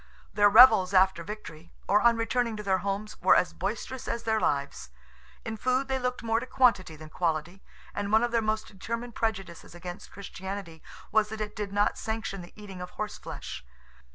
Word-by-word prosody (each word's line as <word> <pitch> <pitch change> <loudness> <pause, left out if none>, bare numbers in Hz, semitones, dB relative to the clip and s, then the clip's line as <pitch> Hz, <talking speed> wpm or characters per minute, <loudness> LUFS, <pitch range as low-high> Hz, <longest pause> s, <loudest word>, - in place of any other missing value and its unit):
Their 205 0 +5
revels 215 -4 +7
after 190 -2 +4
victory, 170 -5 -9
or 205 +2 +4
on 235 -1 +4
returning 230 0 0
to 210 - -6
their 190 -2 +1
homes, 200 +3 -4
were 185 - +6
as 180 - +2
boisterous 225 +6 -4
as 235 0 -3
their 220 -1 +1
lives. 140 - -1 0.6
In 220 0 -4
food 255 +4 0
they 265 0 -1
looked 250 -1 -3
more 225 0 +1
to 255 - -7
quantity 205 -12 +2
than 155 0 -11
quality, 170 +2 -2 0.3
and 205 0 -3
one 220 +2 +5
of 240 - 0
their 230 -1 +2
most 215 0 -1
determined 230 +4 -6
prejudices 195 -8 -4
against 175 +1 -8
Christianity 190 -4 -7 0.3
was 215 -1 +3
that 220 0 -6
it 210 -1 -4
did 210 -2 -4
not 205 +1 +1
sanction 220 -3 -4
the 175 - -12
eating 195 -3 -9
of 180 - -6
horse 215 -1 -4
flesh. - - -7
210 Hz, 190 wpm, -28 LUFS, 185-225 Hz, 0.6 s, revels